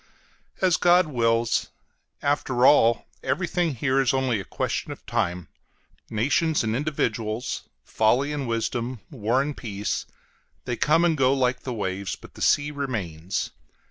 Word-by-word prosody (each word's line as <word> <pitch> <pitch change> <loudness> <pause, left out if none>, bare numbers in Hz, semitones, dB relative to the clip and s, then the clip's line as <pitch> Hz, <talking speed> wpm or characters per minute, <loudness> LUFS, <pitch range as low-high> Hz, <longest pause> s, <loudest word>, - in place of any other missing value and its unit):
As 185 -3 +4
God 175 +1 +5
wills! 115 -4 +1 0.5
After 135 -3 +1
all, 115 -5 +5 0.2
everything 175 -4 0
here 135 +2 +2
is 135 0 +2
only 130 -4 +1
a - - -5
question - - -3
of - - -10
time: 85 -1 -1 0.6
nations 145 +8 +1
and 110 0 0
individuals, 120 -5 -2
folly 125 +7 +2
and 140 -3 -3
wisdom, 115 +1 -2
war 125 0 +1
and 145 0 -4
peace, 105 -3 -3 0.6
they 125 - -1
come 155 +7 +3
and 165 -2 +3
go 135 -1 +3
like 125 -1 +1
the 130 - -6
waves, 95 -2 -3
but - - -15
the - - -12
sea 145 0 +3
remains. 100 - -3
125 Hz, 140 wpm, -25 LUFS, 110-145 Hz, 0.6 s, God